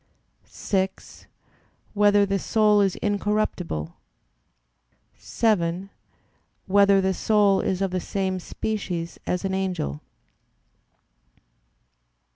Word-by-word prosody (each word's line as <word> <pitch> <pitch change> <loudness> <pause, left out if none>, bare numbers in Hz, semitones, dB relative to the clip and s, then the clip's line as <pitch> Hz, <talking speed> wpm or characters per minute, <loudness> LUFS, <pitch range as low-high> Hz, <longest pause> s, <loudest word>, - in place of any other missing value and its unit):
(6) 190 -1 -4 0.7
Whether 205 -1 +4
the 195 0 -1
soul 210 +1 +3
is 195 -2 +1
incorruptible? 205 - -2 1.2
(7) 195 -4 -1 0.7
Whether 200 0 +4
the 190 0 +1
soul 205 0 +3
is 190 +1 -1
of 195 - -1
the 185 - -1
same 190 0 -2
species 180 -4 -4
as 180 +1 -1
an 190 - -1
angel? 180 - -2
195 Hz, 85 wpm, -24 LUFS, 185-205 Hz, 1.2 s, Whether